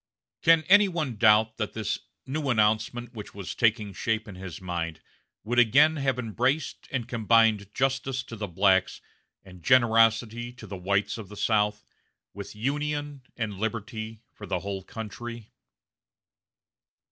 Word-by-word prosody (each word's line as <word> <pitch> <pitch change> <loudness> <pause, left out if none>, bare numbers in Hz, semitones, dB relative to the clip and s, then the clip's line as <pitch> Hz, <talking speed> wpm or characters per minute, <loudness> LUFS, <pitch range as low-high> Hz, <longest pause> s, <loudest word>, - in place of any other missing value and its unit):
Can 165 -1 +5
any 205 +5 +6
one 155 -9 -3
doubt 110 +1 +4
that 110 -3 -3
this 110 -2 -2 0.3
"new 140 +1 -3
announcement" 110 +2 +1
which 105 -4 -9
was 100 -3 -5
taking 110 -3 +1
shape 110 +1 -2
in 100 - -8
his 95 -2 -8
mind 85 -3 -4 0.4
would 120 +3 +1
again 145 +7 +5
have 135 -2 0
embraced 125 +5 -1
and 120 -4 -3
combined 110 -3 +3
justice 135 -1 0
to 115 - -9
the 105 -1 -4
blacks 95 +1 +2 0.5
and 90 -2 -14
generosity 115 +2 +3
to 125 -3 -12
the 100 -2 -7
whites 100 +4 -1
of 100 -4 -9
the 105 - -11
South, 105 -1 +1 0.5
with 100 +1 -8
Union 145 +4 -2 0.2
and 105 -4 -3
liberty 110 0 -4
for 105 - -10
the 90 -2 -2
whole 100 -1 -4
country? 115 +2 -8
110 Hz, 145 wpm, -27 LUFS, 105-125 Hz, 0.5 s, any